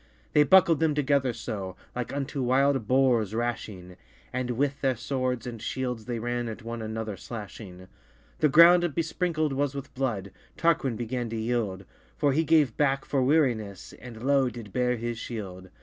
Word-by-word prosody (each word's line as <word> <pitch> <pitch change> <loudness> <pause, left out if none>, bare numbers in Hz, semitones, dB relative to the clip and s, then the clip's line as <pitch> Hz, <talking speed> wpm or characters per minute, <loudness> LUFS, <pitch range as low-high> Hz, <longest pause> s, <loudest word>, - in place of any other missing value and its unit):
They 150 - +6
buckled 165 +1 +5
them 160 -2 +2
together 140 -3 +2
so, 100 -5 -5 0.2
Like 125 -1 -3
unto 140 0 -3
wild 130 -1 +2
boares 125 -5 +2
rashing; 105 -6 -4 0.4
And 125 0 -2
with 140 +3 -1
their 135 -2 +2
swords 130 0 -2
and 115 -3 -6
shields 125 -4 -3
they 120 -1 -3
ran 120 +1 -2
At 110 +1 -8
one 115 0 -5
another 110 -1 -4
slashing: 95 -4 -9 0.5
The 150 - +4
ground 170 +4 +8
besprinkled 165 -2 -1
was 140 0 -1
with 140 0 -7
blood: 110 -8 -2 0.3
Tarquin 165 -7 +2
began 120 +1 -3
to 115 - -4
yield; 110 -4 -2 0.3
For 145 -2 +2
he 160 +4 +2
gave 155 -7 +3
backe 135 -2 +1
for 135 - 0
wearinesse, 125 - +1
And 120 -2 -10
lowe 135 -1 +3
did 115 -5 -10
beare 125 -1 +1
his 115 0 -4
shield. 95 -5 -7
125 Hz, 165 wpm, -27 LUFS, 110-140 Hz, 0.5 s, ground